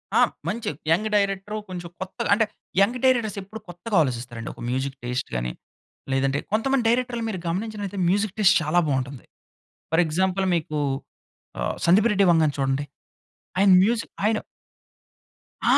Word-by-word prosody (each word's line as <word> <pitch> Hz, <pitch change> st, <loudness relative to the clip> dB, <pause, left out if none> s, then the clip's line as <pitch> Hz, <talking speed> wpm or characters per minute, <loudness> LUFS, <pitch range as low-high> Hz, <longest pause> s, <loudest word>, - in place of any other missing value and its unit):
ఆ! -, -, +6 dB, 0.3 s
మంచి 230 Hz, +2 st, -2 dB, 0.2 s
young 210 Hz, +7 st, +2 dB
director, 200 Hz, +1 st, 0 dB
కొంచెం 175 Hz, -2 st, -6 dB
కొత్తగా 190 Hz, 0 st, -4 dB
అంటే 220 Hz, +2 st, +3 dB, 0.4 s
యంగ్ 235 Hz, +6 st, +3 dB
డైరెక్టర్స్ 235 Hz, -5 st, +2 dB
ఎప్పుడూ 200 Hz, +3 st, -9 dB
కొత్తగా 185 Hz, +5 st, -4 dB
ఆలోచిస్తారండి. 120 Hz, -4 st, -3 dB
ఒక -, -, -13 dB
మ్యూజిక్ 130 Hz, +2 st, -2 dB
టేస్ట్‌‌‌‌‌‌‌‌ 125 Hz, +2 st, -3 dB
గాని, -, -, -2 dB, 0.6 s
లేదంటే 135 Hz, +1 st, +1 dB
కొంతమంది 250 Hz, +4 st, +1 dB
డైరెక్టర్‌‌‌‌‌‌లని 240 Hz, -1 st, 0 dB
మీరు 185 Hz, -, -4 dB
గమనించినట్లైతే, 200 Hz, +2 st, -3 dB
మ్యూజిక్ 200 Hz, +1 st, +1 dB
టేస్ట్ 205 Hz, -1 st, +6 dB
చాలా 155 Hz, +3 st, +2 dB
బాగుంటుంది. 130 Hz, -1 st, -2 dB, 0.7 s
ఫర్ 165 Hz, -, +5 dB
ఎక్సాంపుల్ 185 Hz, +4 st, 0 dB
మీకు 155 Hz, -2 st, -2 dB, 0.8 s
ఆహ్! -, -, -1 dB
సందీప్ 200 Hz, +7 st, +5 dB
రెడ్డి 200 Hz, 0 st, +4 dB
వంగా‌‌‌‌‌‌‌‌‌‌ను 155 Hz, -3 st, +3 dB
చూడండి. 135 Hz, +1 st, 0 dB, 0.7 s
ఆయన 195 Hz, +1 st, +5 dB, 0.2 s
మ్యూజిక్ 230 Hz, +1 st, -1 dB
ఆయన 215 Hz, +1 st, +2 dB, 1.3 s
ఆ! -, -, +6 dB
190 Hz, 140 wpm, -24 LUFS, 145-215 Hz, 1.3 s, ఆ